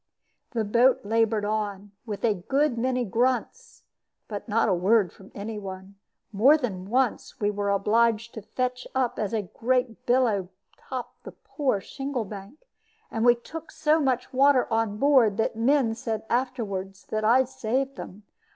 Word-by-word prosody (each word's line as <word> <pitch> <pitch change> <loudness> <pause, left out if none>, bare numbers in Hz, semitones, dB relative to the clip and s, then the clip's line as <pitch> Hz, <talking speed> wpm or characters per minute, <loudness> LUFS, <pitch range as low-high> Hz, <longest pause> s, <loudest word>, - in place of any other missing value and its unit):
The 230 -2 0
boat 240 +5 +4
labored 220 -1 +1
on, 205 -2 -3 0.2
with 210 +1 -3
a 220 - +3
good 270 +9 0
many 250 +1 0
grunts, 255 - -1 0.4
but 210 +2 -6
not 225 +2 +2
a 200 - +3
word 190 +2 +3
from 195 - -16
any 210 +1 -5
one. 190 0 -8 0.4
More 250 +9 +5
than 195 -9 -4
once 255 0 0
we 205 -1 +1
were 205 0 -2
obliged 225 +3 +2
to 220 - -7
fetch 250 +4 -3
up 260 -2 0
as 210 -1 -1
a 220 -2 -1
great 245 +3 -1
billow 230 -7 +2 0.3
topped 255 -2 -8
the - - -9
poor 265 -9 -2
shingle 270 0 -4
bank; 205 - -10 0.5
and 225 - -1
we 240 0 +6
took 320 +7 -9
so 310 +1 +2
much 260 -4 -1
water 275 0 +4
on 225 -2 0
board 250 -6 +4
that 220 - 0
the 225 - -10
men 255 -1 +3
said 225 -2 -4
afterward 225 -7 -2
that 215 0 -1
I 240 +4 +5
saved 260 +1 -2
them. 205 -2 -9
230 Hz, 165 wpm, -26 LUFS, 205-255 Hz, 0.5 s, we